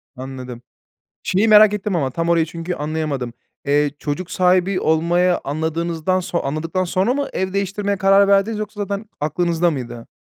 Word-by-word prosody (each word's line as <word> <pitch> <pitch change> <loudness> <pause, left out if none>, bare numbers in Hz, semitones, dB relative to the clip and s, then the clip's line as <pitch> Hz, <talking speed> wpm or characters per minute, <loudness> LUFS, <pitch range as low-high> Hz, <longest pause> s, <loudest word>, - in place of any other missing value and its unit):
Anladım. 130 -2 -8 0.6
Şeyi 200 +5 +1
merak 215 -1 +7
ettim 205 -2 -2
ama 135 -5 0
tam 165 +3 -2
orayı 165 -1 +3
çünkü 165 +2 -5
anlayamadım. 150 -5 -3 0.3
Eee, 145 +1 +2
çocuk 165 +5 -4
sahibi 185 +1 +2
olmaya 175 +3 +2
anladığınızdan 160 +4 -1
son 175 -1 -2
anladıktan 160 +6 -2
sonra 185 +6 +1
mı 285 +1 -2
ev 190 0 -2
değiştirmeye 200 +1 -1
karar 195 0 +4
verdiniz 200 +2 +2
yoksa 210 0 -5
zaten 200 +1 -3
aklınızda 170 +3 +1
mıydı? 120 -4 -6
175 Hz, 155 wpm, -20 LUFS, 155-195 Hz, 0.6 s, merak